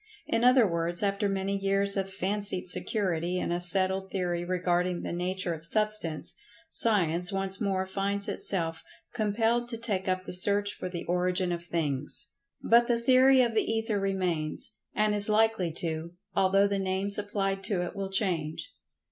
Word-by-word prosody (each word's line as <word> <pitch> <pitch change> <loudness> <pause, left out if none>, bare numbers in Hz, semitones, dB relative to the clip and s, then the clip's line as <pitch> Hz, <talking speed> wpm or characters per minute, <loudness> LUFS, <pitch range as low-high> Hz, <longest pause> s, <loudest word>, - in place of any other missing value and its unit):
In 230 - 0
other 250 -1 +6
words, 170 +1 -1
after 200 0 0
many 195 0 -2
years 195 0 +1
of 195 -1 -2
fancied 195 -1 -2
security 180 -3 -1
in 180 - -2
a 175 +1 -1
settled 190 +1 +2
theory 175 -2 -2
regarding 180 0 -1
the - - -4
nature 180 0 -2
of 160 -1 -9
Substance, 210 -4 0 0.4
Science 180 -4 +3
once 195 +1 -1
more 190 -2 0
finds 200 +1 -2
itself 165 -4 +1 0.3
compelled 225 +2 0
to 230 - -4
take[Pg 230 +1 +1 0.2
108] - - +2
up 185 0 -3
the - - -5
search 200 +2 +3
for 185 - -6
the 175 -2 -5
origin 180 +1 0
of 170 0 -4
things. 150 -5 -2 0.3
But 235 +1 +4
the 240 - +2
theory 260 +2 +5
of 235 -2 -1
the 220 - +3
Ether 225 -2 -1
remains—and 195 +3 -2
is 205 0 +3
likely 215 -5 +2
to—although 175 +4 -1
the 200 -1 -1
names 195 +2 -1
applied 195 -1 -2
to 190 -5 -1
it 175 - -8
will 195 -1 -4
change. 180 -6 -2
195 Hz, 165 wpm, -28 LUFS, 175-205 Hz, 0.4 s, other